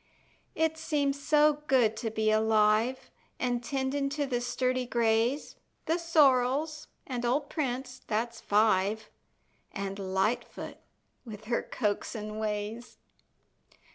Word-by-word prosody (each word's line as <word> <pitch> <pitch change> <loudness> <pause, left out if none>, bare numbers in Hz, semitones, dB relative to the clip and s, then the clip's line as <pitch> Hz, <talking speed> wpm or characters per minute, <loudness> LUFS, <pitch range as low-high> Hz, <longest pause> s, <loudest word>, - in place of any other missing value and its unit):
It 320 0 0
seems 285 -3 0
so 300 0 +3
good 240 -5 +3
to 225 - -2
be 220 0 +1
alive, 220 +3 +2 0.3
An' 245 -1 0
tendin' 275 +2 -1
to 290 +1 -1
the 245 -3 -1
sturdy 255 0 -1
grays, 235 +3 +1 0.3
The 330 +2 +1
sorrels, 300 -1 +2 0.2
and 245 -3 -4
old 275 +4 0
Prince, 255 -3 -3
that's 230 +2 -2
five 210 0 +2 0.6
An' 195 -1 -3
Lightfoot 195 +3 -2 0.5
with 215 -4 -9
her 235 +2 0
coaxing 215 -1 -3
ways. 215 +2 -4
245 Hz, 110 wpm, -29 LUFS, 215-275 Hz, 0.6 s, so